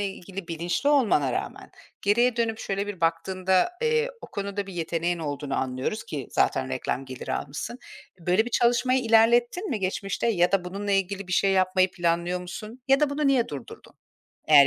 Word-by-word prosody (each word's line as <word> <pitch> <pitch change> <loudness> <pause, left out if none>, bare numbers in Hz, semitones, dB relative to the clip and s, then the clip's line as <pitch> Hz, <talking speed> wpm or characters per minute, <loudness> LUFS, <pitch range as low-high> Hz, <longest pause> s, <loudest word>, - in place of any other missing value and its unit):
ilgili 195 -2 -5
bilinçli 170 - -1
olmana 210 - +3
rağmen - - -5 0.3
geriye 235 +4 +3
dönüp, 225 -1 0
şöyle 200 +1 -2
bir 205 -3 -6
baktığında, 185 - +1
eee, 465 +1 +2
o - - -9
konuda 200 0 -4
bir 195 - -8
yeteneğin 170 0 -1
olduğunu 145 -3 -4
anlıyoruz 130 +12 -2
ki 145 - -5
zaten 65 - +1
reklam 95 - -2
geliri 130 -2 -6
almışsın. 150 - -4 0.4
Böyle 180 +6 +2
bir 240 - -6
çalışmayı 245 +2 +3
ilerlettin 240 - +3
mi, 230 - -1
geçmişte 195 +3 -2
ya 180 -5 +2
da 195 -2 +2
bununla 200 +3 -3
ilgili 195 0 -1
bir 180 - -4
şey 195 +2 +3
yapmayı 185 0 +3
planlıyor 175 0 0
musun 210 +7 -8
ya 270 +1 +5
da 300 -2 +3
bunu 290 +1 0
niye 265 -4 +3
durdurdun, 140 -5 -9 0.5
eğer 145 -2 +9
195 Hz, 170 wpm, -26 LUFS, 170-230 Hz, 0.5 s, eğer